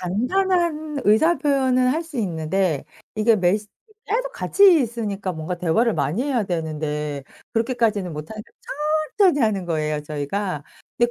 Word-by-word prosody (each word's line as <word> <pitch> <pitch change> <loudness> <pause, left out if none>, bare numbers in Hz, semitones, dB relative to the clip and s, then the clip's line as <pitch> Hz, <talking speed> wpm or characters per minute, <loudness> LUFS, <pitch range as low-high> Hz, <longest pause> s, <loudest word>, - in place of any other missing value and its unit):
간단한 310 - 0
의사 315 +12 +4
표현은 260 -4 +2
할 310 +6 0
수 320 -5 -10
있는데 170 -3 -1 0.3
이게 215 +1 +4
메시지 200 +3 +1 0.4
짤막 - - -1
같이 395 -8 +5
있으니까 210 -5 -3
뭔가 160 +2 -5
대화를 205 +7 +2
많이 150 - 0
해야 265 -5 0
되는데 150 -4 -3 0.3
그렇게까지는 225 -6 0
못하니까 165 +9 -8 0.7
천천히 365 -8 +5
하는 205 -6 +1
거예요 155 -2 -1
저희가. 150 +3 -3 0.3
근데 240 0 +2
215 Hz, 330 characters per minute, -22 LUFS, 165-265 Hz, 0.7 s, 같이